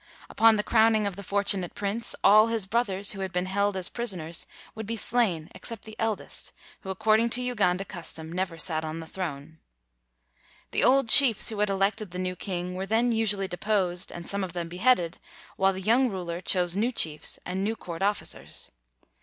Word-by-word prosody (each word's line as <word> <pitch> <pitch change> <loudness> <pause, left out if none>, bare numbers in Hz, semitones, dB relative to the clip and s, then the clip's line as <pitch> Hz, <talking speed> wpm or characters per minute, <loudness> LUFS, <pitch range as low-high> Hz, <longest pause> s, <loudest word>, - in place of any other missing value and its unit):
Upon 225 0 +5
the 210 - 0
crowning 220 -1 +3
of 200 -2 -3
the 200 - -8
fortunate 200 -2 +2
prince, 210 +4 -3
all 215 +2 +7
his 225 -3 0
brothers 200 -2 0
who 195 - -8
had 190 -1 -3
been 180 0 -1
held 200 +1 0
as 185 -1 +1
prisoners 180 -9 -2 0.3
would 220 -1 -7
be 230 +1 -3
slain 200 -9 +1
except 230 -3 -7
the 220 0 -10
eldest, 220 -2 -2 0.3
who 190 - -10
ac 190 - -4
cording 220 +3 +3
to 245 - +2
Uganda 195 -6 0
custom, 165 -3 -5
never 180 -1 -3
sat 160 -1 +1
on 160 +1 -5
the 165 - -7
throne. 160 -3 -6 1.1
The - - +2
old 270 0 +4
chiefs 240 -2 +6
who 215 -2 -5
had 210 0 +2
elected 195 +2 0
the 180 - -8
new 185 0 -3
king 180 -2 -4
were 190 +1 -4
then 230 +3 +2
usually 210 -4 +1
deposed 185 -1 -1
and 170 0 -8
some 200 0 -1
of 180 -3 -5
them 170 -1 -4
beheaded; 180 -2 +1 0.4
while 195 0 +3
the 190 - -6
young 240 +6 +3
rul 180 -4 -5
er 170 +1 -5
chose 180 -2 +1
new 225 +5 +1
chiefs 155 -10 0
and 185 +2 -3
new 220 +3 -1
court 170 -5 -8
officers. 200 +1 -2
195 Hz, 195 wpm, -27 LUFS, 180-220 Hz, 1.1 s, all